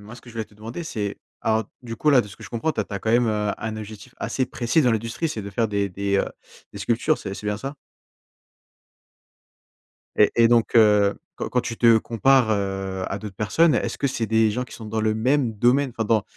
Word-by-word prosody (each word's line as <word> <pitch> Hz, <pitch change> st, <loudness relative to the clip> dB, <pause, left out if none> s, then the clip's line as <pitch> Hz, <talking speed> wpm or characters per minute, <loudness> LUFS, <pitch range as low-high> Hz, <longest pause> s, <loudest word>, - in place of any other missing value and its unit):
moi, 105 Hz, +3 st, -11 dB
ce -, -, -13 dB
que 120 Hz, -, -16 dB
je -, -, -15 dB
voulais 110 Hz, -, -3 dB
te 105 Hz, -, -23 dB
demander, 115 Hz, +10 st, -7 dB
c'est 105 Hz, -9 st, -3 dB, 0.2 s
alors, 110 Hz, 0 st, +1 dB, 0.2 s
du 115 Hz, -2 st, -6 dB
coup, 150 Hz, +6 st, +2 dB
là, 135 Hz, -, +6 dB
de 105 Hz, -, -6 dB
ce 95 Hz, -, -11 dB
que -, -, -14 dB
je -, -, -9 dB
comprends, 120 Hz, +7 st, -1 dB
tu -, -, -2 dB
as 100 Hz, -2 st, -4 dB
quand 110 Hz, -, -2 dB
même 120 Hz, -1 st, +4 dB, 0.3 s
un 110 Hz, 0 st, -5 dB
objectif 110 Hz, +3 st, -9 dB
assez 130 Hz, -, -1 dB
précis 125 Hz, +4 st, +1 dB
dans 125 Hz, -, +3 dB
l'industrie, 115 Hz, +9 st, -2 dB
c'est 110 Hz, -, -4 dB
de 100 Hz, -, -7 dB
faire 110 Hz, +2 st, 0 dB
des 100 Hz, -1 st, 0 dB
des, 100 Hz, +2 st, -1 dB
heu, -, -, +1 dB, 0.5 s
des 100 Hz, -, -8 dB
sculptures, 120 Hz, +8 st, +1 dB
c'est 100 Hz, -, -6 dB
c'est 105 Hz, -, -8 dB
bien 105 Hz, 0 st, 0 dB
ça? 135 Hz, +5 st, -6 dB, 2.4 s
Et 105 Hz, -, +5 dB
et 115 Hz, -, +5 dB
et -, -, +7 dB
donc, 120 Hz, -1 st, +2 dB
heu, 105 Hz, -3 st, +5 dB, 0.2 s
quand -, -, -4 dB
quand 125 Hz, -, +1 dB
tu 115 Hz, -, -5 dB
te 115 Hz, -2 st, +6 dB
compares, 120 Hz, +2 st, +3 dB
heu, 95 Hz, -2 st, -2 dB
à 95 Hz, -, -3 dB
d'autres 105 Hz, -3 st, -8 dB
personnes, 150 Hz, +9 st, +3 dB
est-ce -, -, -2 dB
que 140 Hz, -, 0 dB
c'est 130 Hz, -4 st, -2 dB
des 110 Hz, 0 st, +3 dB
gens 125 Hz, +4 st, -2 dB
qui 125 Hz, -, -12 dB
sont 110 Hz, -, -9 dB
dans 110 Hz, +1 st, -2 dB
le 110 Hz, 0 st, +1 dB
même 125 Hz, +1 st, +1 dB
domaine, 125 Hz, +5 st, +2 dB
enfin 110 Hz, -, 0 dB
dans, 110 Hz, -2 st, +3 dB
110 Hz, 240 wpm, -23 LUFS, 105-125 Hz, 2.4 s, et